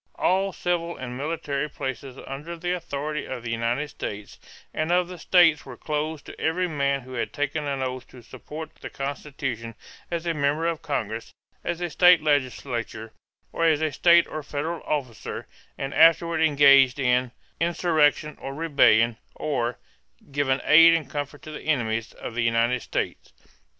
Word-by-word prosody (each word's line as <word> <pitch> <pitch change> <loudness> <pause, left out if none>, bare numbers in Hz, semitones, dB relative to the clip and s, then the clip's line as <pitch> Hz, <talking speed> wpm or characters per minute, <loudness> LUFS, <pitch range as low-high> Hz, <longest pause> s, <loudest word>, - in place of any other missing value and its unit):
All 195 +1 +1
civil 170 -1 -2
and 125 -1 -6
military 145 0 -3
places 135 -1 -6
under 150 +5 -7
the 175 +1 -2
authority 150 -4 -3
of 125 -3 -6
the 115 - -4
United 115 +5 -1
States 105 -6 -7 0.3
and 155 +2 -1
of 180 0 +3
the 180 -1 -9
states 170 -3 +4
were 125 -3 -10
closed 155 -1 -3
to - - -11
every 180 +3 +1
man 140 -3 0
who 130 +1 -11
had 120 - -2
taken 145 +1 -2
an 135 -2 -2
oath 130 -1 -4
to 125 -2 -14
support 155 +6 -9
the - - -8
Constitution 135 -5 -5 0.3
as 170 -1 -3
a 170 - 0
member 150 +2 0
of 165 -2 -1
Congress, 110 -5 -4 0.3
as 175 0 -3
a 175 - -1
state 180 -2 +6
legislator, 125 -6 -1 0.4
or 165 - 0
as 160 -3 +4
a 155 -1 0
state 170 +2 +5
or 155 - -6
federal 150 +3 -4
officer, 130 -7 -3 0.3
and 135 0 -4
afterward 165 0 +5
engaged 140 -4 +6
in 125 -2 +1 0.3
"insurrection 160 -3 +1
or 135 0 -6
rebellion," 120 -7 +4 0.2
or 125 -5 -2 0.5
"given 135 -1 0
aid 165 +2 +8
and 155 -5 -3
comfort 145 -1 -5
to 155 - -8
the 155 - -7
enemies" 115 -7 0
of - - -8
the 120 - -1
United 115 +2 +2
States. - - -4
145 Hz, 165 wpm, -25 LUFS, 130-160 Hz, 0.5 s, aid